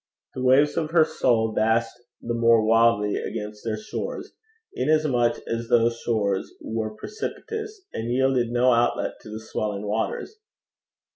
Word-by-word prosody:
The 130 - -5
waves 135 +3 +4
of 155 -2 0
her 165 -1 +5
soul 115 -7 +1
dashed 115 +1 +1 0.3
the 120 - -2
more 115 -1 +4
wildly 115 -2 +3
against 105 0 -5
their 110 -2 -2
shores, 485 - -6 0.4
inasmuch 130 -4 +2
as 115 0 -3
those 115 0 +2
shores 100 -4 -1
were 110 -1 -4
precipitous, 435 - -6
and 115 +1 -4
yielded 130 -1 +2
no 125 +1 +3
outlet 120 +1 0
to - - -12
the 110 +1 -6
swelling 105 -2 -4
waters. 110 - -3
115 Hz, 140 wpm, -24 LUFS, 110-130 Hz, 0.4 s, her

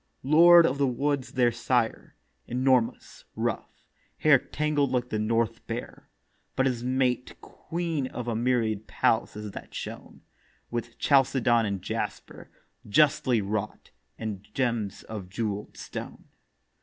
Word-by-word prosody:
Lord 170 +4 +7
of 140 -2 0
the 140 - +3
Woods 140 +2 -1
their 125 -2 +3
Sire; 120 0 -1 0.3
enormous, 125 -1 0
rough, - - -4 0.3
Hair 150 -3 +5
tangled 150 -3 0
like 125 -1 -1
the 110 - -2
north 115 +1 -1
bear: 115 +1 -6 0.5
but 130 - +2
his 125 -3 -1
Mate 125 -1 0
Queen 165 -5 -4
of 125 -2 -6
a 115 - -1
myriad 115 -3 0
palaces 105 -2 0
that - - -10
shone - - -8 0.5
With 120 0 -4
chalcedon 130 -4 +3
and 100 -2 -3
jasper, - - -5 0.4
justly 140 -1 +3
wrought, 105 +1 -4 0.3
And 105 -4 -5
gems 115 -6 -1
of 100 -5 -7
jewel'd 105 0 -4
stone. - - -8
120 Hz, 125 wpm, -27 LUFS, 110-135 Hz, 0.5 s, Lord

